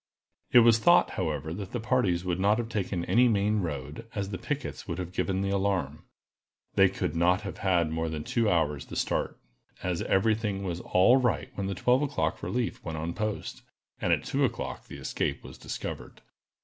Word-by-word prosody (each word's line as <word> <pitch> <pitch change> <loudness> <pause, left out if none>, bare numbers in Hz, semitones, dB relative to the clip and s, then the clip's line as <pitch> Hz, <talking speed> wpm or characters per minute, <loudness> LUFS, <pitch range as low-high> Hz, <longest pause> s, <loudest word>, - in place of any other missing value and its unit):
It 120 - +8
was 115 -1 +6
thought, 175 +9 +5
however, 80 -3 -2
that 95 +1 -7
the 120 - -1
parties 110 -7 +1
would 90 0 -1
not 105 +3 +3
have 120 -1 -3
taken 95 -5 -2
any 125 +2 +4
main 105 -1 +2
road, 75 +4 -5
as 100 -2 -2
the 95 - -4
pickets 145 +4 -4
would 85 -3 -3
have 90 -2 -5
given 95 +1 -1
the 100 0 -1
alarm. 95 -7 -1 0.7
They - - +5
could - - -3
not 90 +3 +3
have 100 -3 -7
had 85 -5 +2
more 80 0 -1
than 75 -1 -4
two 115 +3 +1
hours 75 -5 +1
the - - -8
start, - - -1 0.5
as 90 -2 -1
every 105 +3 +3
thing 105 -3 -2
was 90 -3 -3
all 95 +8 +5
right 115 - 0
when 100 -1 -3
the 100 - -2
twelve 125 +8 +3
o'clock 145 -1 -1
relief 120 -1 -2
went 80 -1 -4
on 80 +2 -3
post, 110 +1 -4 0.4
and - - +1
at - - +2
two - - 0
o'clock - - -2
the - - -9
escape - - -2
was - - -11
discovered. - - -6
95 Hz, 200 wpm, -28 LUFS, 85-110 Hz, 0.7 s, It